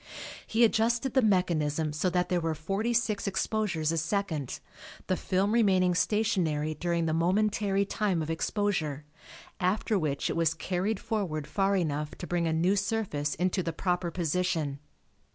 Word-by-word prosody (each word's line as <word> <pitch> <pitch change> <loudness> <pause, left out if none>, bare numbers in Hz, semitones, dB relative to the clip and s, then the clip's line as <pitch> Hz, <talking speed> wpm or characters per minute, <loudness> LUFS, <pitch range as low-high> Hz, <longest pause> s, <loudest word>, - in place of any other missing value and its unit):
He 225 +2 +3
adjusted 230 +3 +2
the 260 - +4
mechanism 160 - +1
so 155 +5 0
that 180 0 0
there 180 -1 +1
were 165 -1 -1
46 215 +5 -1
exposures 190 -5 0
a 165 - 0
second, 165 - -2 0.5
the 185 - +1
film 190 +3 0
remaining 190 -6 +3
stationary 175 -7 +1
during 170 0 -1
the 160 - 0
momentary 200 +3 +1
time 195 -5 0
of 155 - -3
exposure, 160 -5 -1 0.5
after 200 +2 +1
which 145 -4 -1
it - - -2
was 165 -1 +2
carried 190 +3 -1
forward 175 -9 -2
far 195 +5 +1
enough 150 -4 -1
to - - -6
bring 175 -1 0
a - - +1
new 170 +5 +2
surface 200 -8 -1
into 185 +1 0
the 165 -2 -3
proper 180 0 -1
position. 170 -4 -1
180 Hz, 150 wpm, -29 LUFS, 160-205 Hz, 0.5 s, the